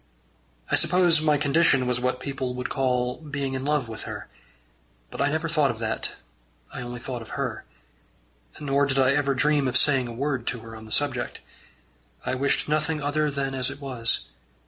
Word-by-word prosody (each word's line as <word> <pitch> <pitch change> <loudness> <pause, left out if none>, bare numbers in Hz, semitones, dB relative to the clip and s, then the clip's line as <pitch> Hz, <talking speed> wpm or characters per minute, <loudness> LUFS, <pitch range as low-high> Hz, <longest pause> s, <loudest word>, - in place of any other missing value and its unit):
I - - +5
suppose 170 -1 +5
my 150 -1 +3
condition 140 -2 +3
was 125 -1 0
what 125 0 -1
people 135 -3 -4
would 125 0 -4
call 125 -2 0
being 140 -3 -3
in 130 0 -3
love 145 -3 0
with 110 0 -7
her; - - -7 0.8
but - - -4
I 140 - +3
never 160 +3 -1
thought 155 -4 +2
of 120 - -3
that; 110 -1 -1 0.6
I - - -5
only 120 0 -6
thought 125 0 -5
of 115 - -8
her. - - -3 0.9
Nor 140 -1 +1
did 135 -1 0
I 130 -1 +4
ever 140 -1 +1
dream 145 0 +2
of 130 0 +2
saying 135 -2 +4
a - - -6
word 130 0 -2
to 120 -1 -2
her 115 0 -10
on 110 0 -10
the 110 - -13
subject. 135 -3 0 0.8
I - - -1
wished 135 +2 +2
nothing 155 +1 0
other 150 +1 0
than 140 -1 -2
as 130 -1 0
it 140 0 -8
was. 125 -5 0
135 Hz, 190 wpm, -25 LUFS, 125-145 Hz, 0.9 s, I